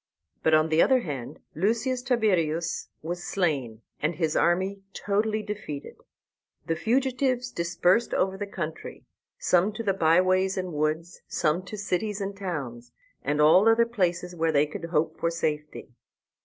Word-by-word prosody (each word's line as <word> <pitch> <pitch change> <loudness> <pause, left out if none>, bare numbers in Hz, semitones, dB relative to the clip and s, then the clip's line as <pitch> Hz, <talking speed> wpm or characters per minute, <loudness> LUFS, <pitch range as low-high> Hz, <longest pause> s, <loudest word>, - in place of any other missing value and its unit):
But 160 - +4
on 155 +1 +3
the 160 +1 +4
other 260 -1 +4
hand 135 - -6 0.2
Lucius 235 - 0
Tiberius 185 - 0
was 175 +2 -4
slain, 135 - -1 0.2
and 155 +3 0
his 160 -1 -1
army 190 +3 +1
totally 215 +1 0
defeated. 205 -9 -6 0.7
The 165 - 0
fugitives 255 - 0
dispersed 175 +6 +1
over 190 0 +1
the 205 +1 -5
country, 160 -5 -6 0.3
some 180 +4 +2
to 230 +2 -5
the 200 -3 +1
by 165 -2 +4
ways 185 +1 +2
and 185 -2 -3
woods, 155 +3 -2
some 155 +4 0
to 210 +3 -7
cities 205 +1 -2
and 200 0 -4
towns, 140 -12 -5 0.3
and 145 +1 -1
all 180 +8 +6
other 230 +1 +5
places 180 -6 -1
where 165 -1 +1
they 145 -1 +3
could 155 +2 -7
hope 160 -1 -1
for 165 - +1
safety. 150 -5 -3
180 Hz, 155 wpm, -26 LUFS, 155-205 Hz, 0.7 s, all